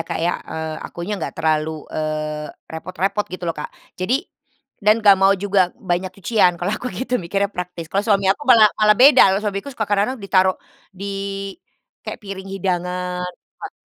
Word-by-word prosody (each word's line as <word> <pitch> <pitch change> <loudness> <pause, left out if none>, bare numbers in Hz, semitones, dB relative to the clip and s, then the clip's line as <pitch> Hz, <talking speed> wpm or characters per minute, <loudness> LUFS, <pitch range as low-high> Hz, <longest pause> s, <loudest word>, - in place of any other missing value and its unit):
Kak, - - -2
ya, 170 +2 -1
eee, 160 -1 -5
akunya 185 +2 -5
nggak - - -5
terlalu, 155 -1 0
eee, 155 -1 -3 0.2
repot-repot 185 +5 -3
gitu 185 0 -7
loh, 165 - 0
Kak. 150 - -6 0.2
Jadi, 235 +10 -1 0.6
dan 215 +1 +3
nggak 200 -2 +8
mau 195 +1 +5
juga 195 -1 +2
banyak 185 -5 -2
cucian 185 -5 +3
kalau 180 +4 -2
aku 245 +3 -3
gitu 250 -3 -2
mikirnya 195 +4 -1
praktis. 175 -2 -6
Kalau 195 - +2
suami 200 -2 +2
aku 275 - -15
malah 225 -4 +8
malah 210 -1 +5
beda, 275 +4 +7 0.2
kalau - - -1
suamiku 200 +4 -3
suka 245 -5 -3
kadang-kadang 205 +5 0
ditaruh 190 -3 +2 0.4
di 200 +1 -5 0.9
kayak - - -7
piring 195 -1 -7
hidangan 180 -1 -2 0.4
ah, - - -5
190 Hz, 170 wpm, -21 LUFS, 175-205 Hz, 0.9 s, nggak